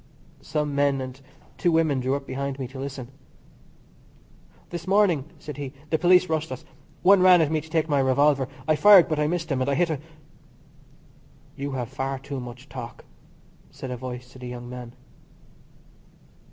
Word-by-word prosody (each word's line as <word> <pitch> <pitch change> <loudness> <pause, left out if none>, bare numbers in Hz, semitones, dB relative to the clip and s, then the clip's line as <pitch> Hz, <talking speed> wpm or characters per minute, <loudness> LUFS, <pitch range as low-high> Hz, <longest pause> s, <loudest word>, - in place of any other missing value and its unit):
(Some 150 -2 -2
men 140 -1 +2
and 130 +1 -7 0.4
two 175 - +2
women 160 -4 +2
drew 130 +2 0
behind 135 0 -4
me 130 -2 -4
to 135 0 -9
listen). 135 -2 -6 1.6
"This 175 0 -6
morning," 190 -8 +3
said 150 -2 -8
he, 140 -2 -6 0.2
"the 160 - +2
police 180 +1 +5
rushed 160 -1 -2
us. 140 +5 -7 0.4
One 195 +1 +6
ran 180 -1 +7
at 155 -2 +2
me 155 -1 +1
to 160 - -14
take 160 -1 +1
my 145 -3 +2
revolver. 135 0 +3 0.2
I 155 - +4
fired 200 +1 +8
but 155 -1 -1
I 150 - +2
missed 165 -1 -2
him, 130 -1 0
and 130 - 0
I 140 - +1
hit 175 +1 +2
a 150 - -2 0.8
" - - -29
"You 140 0 -4
have 125 -3 -3
far 135 +1 -3
too 135 +1 -6
much 125 +2 -9
talk," 125 -4 -9 0.6
said 130 - -8
a - - -2
voice 125 0 -7
to 130 - -14
the 125 - -7
young 120 0 -7
man. 125 -1 -8
140 Hz, 180 wpm, -25 LUFS, 130-160 Hz, 1.6 s, fired